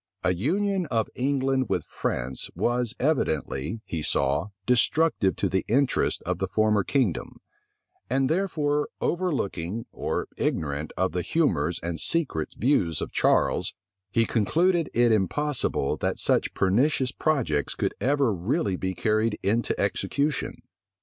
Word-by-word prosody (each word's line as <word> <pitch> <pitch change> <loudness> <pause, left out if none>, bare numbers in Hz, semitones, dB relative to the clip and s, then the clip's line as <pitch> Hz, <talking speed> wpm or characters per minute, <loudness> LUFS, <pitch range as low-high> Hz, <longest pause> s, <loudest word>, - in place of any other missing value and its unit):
A 90 - +3
union 185 - 0
of 115 -4 0
England 135 0 0
with 90 - 0
France 60 +1 -3
was 120 -1 0
evidently, 110 - -1
he 80 - -4
saw, 70 +3 +1 0.2
destructive 125 -3 +3
to - - 0
the 95 - 0
interests 135 +4 +1
of 90 0 -2
the 95 - -1
former 105 0 +2
kingdom; 120 - -1 0.7
and 135 +1 +2
therefore, 150 -4 0
overlooking 115 - -1
or - - -2
ignorant 75 0 -1
of 95 - +1
the 90 - -1
humors 90 - +1
and 85 -1 -3
secret 135 - -1
views 100 - +2
of - - -4
Charles, - - +2 0.3
he 115 +3 +2
concluded 165 - +2
it 120 0 +4
impossible 110 - 0
that - - -1
such - - +1
pernicious 130 +7 +2
projects 115 - 0
could - - -1
ever 140 -3 +2
really 100 - 0
be 95 0 -3
carried 110 0 +1
into 110 +5 0
execution. 140 +9 -1
115 Hz, 130 wpm, -26 LUFS, 95-145 Hz, 0.7 s, it